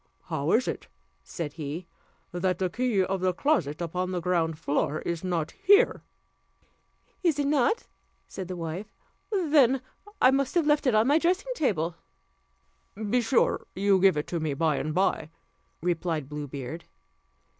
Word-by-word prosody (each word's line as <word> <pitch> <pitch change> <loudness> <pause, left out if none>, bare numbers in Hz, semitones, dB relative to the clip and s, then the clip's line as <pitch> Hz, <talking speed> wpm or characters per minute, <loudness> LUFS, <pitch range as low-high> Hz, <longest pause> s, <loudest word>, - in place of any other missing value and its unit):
"How - - -1
is - - +3
it," - - -4 0.4
said 145 - -5
he, 160 +2 -5 0.5
"that 180 0 0
the 185 -1 -1
key 235 -3 +1
of 190 0 -2
the 185 -1 +2
closet 180 - 0
upon 180 +2 -2
the 185 -1 -2
ground 165 -2 0
floor 155 -1 -1
is 170 0 -3
not 170 -4 -1
here?" 405 +4 +4 1.2
"Is 335 -6 +2
it 290 - 0
not?" 285 - +2 0.4
said 190 - -7
the 185 - -5
wife, 175 +5 -5 0.4
"then 295 - +3 0.4
I 255 - +6
must 275 +2 0
have 340 -3 +3
left 295 -1 +2
it 245 - +3
on 215 +1 +4
my 290 +5 +4
dressing 370 +9 0
table." 175 - -1 1.0
"Be 220 +4 0
sure 235 +2 +1
you 195 0 +3
give 190 -4 +4
it 150 - -4
me 155 -4 -1
by 155 -1 +1
and 155 - -2
by," 180 -4 +1 0.5
replied 165 -4 -1
Blue 150 0 -5
Beard. 140 +4 -7
185 Hz, 155 wpm, -27 LUFS, 165-265 Hz, 1.2 s, I